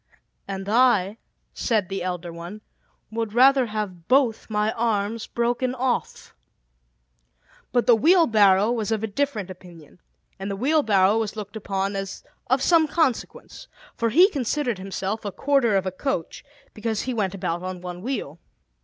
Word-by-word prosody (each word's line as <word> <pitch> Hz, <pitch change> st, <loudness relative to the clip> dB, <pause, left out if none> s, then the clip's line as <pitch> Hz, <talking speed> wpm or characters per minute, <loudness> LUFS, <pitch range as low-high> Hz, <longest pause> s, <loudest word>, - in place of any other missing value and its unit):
"And 195 Hz, 0 st, -5 dB
I," 220 Hz, -3 st, +3 dB, 0.3 s
said 215 Hz, -6 st, 0 dB
the 195 Hz, 0 st, -4 dB
elder 175 Hz, -1 st, -4 dB
one, 175 Hz, +5 st, -9 dB, 0.5 s
"would 225 Hz, -1 st, -3 dB
rather 265 Hz, 0 st, +5 dB
have 205 Hz, -6 st, -5 dB
both 255 Hz, -5 st, +2 dB
my 210 Hz, 0 st, 0 dB
arms 220 Hz, -1 st, -1 dB
broken 245 Hz, +2 st, -1 dB
off." 255 Hz, -1 st, -2 dB, 1.4 s
But 245 Hz, -1 st, +2 dB
the 240 Hz, -, +6 dB
Wheelbarrow 220 Hz, -, +4 dB
was 225 Hz, -2 st, -2 dB
of 220 Hz, -1 st, -1 dB
a -, -, 0 dB
different 215 Hz, -4 st, -2 dB
opinion; 175 Hz, -3 st, -14 dB, 0.4 s
and 195 Hz, +1 st, -4 dB
the 200 Hz, -, -3 dB
Wheelbarrow 220 Hz, -6 st, +3 dB
was 220 Hz, -1 st, -3 dB
looked 210 Hz, 0 st, -7 dB
upon 195 Hz, -1 st, -2 dB
as 195 Hz, 0 st, -5 dB, 0.2 s
of 260 Hz, +2 st, +1 dB
some 330 Hz, -3 st, +4 dB
consequence, 295 Hz, -5 st, -2 dB, 0.3 s
for 230 Hz, -, 0 dB
he 350 Hz, -, +6 dB
considered 255 Hz, -, -1 dB
himself 195 Hz, +2 st, -4 dB
a 205 Hz, -, -4 dB
quarter 270 Hz, -3 st, +2 dB
of 190 Hz, -1 st, +1 dB
a 185 Hz, -, -1 dB
coach, 185 Hz, -, -4 dB, 0.3 s
because 220 Hz, 0 st, -2 dB
he 255 Hz, -, -3 dB
went 200 Hz, -4 st, -1 dB
about 180 Hz, -3 st, -2 dB
upon 185 Hz, 0 st, -6 dB
one 180 Hz, 0 st, -7 dB
wheel. 260 Hz, +6 st, -4 dB
215 Hz, 155 wpm, -24 LUFS, 195-245 Hz, 1.4 s, the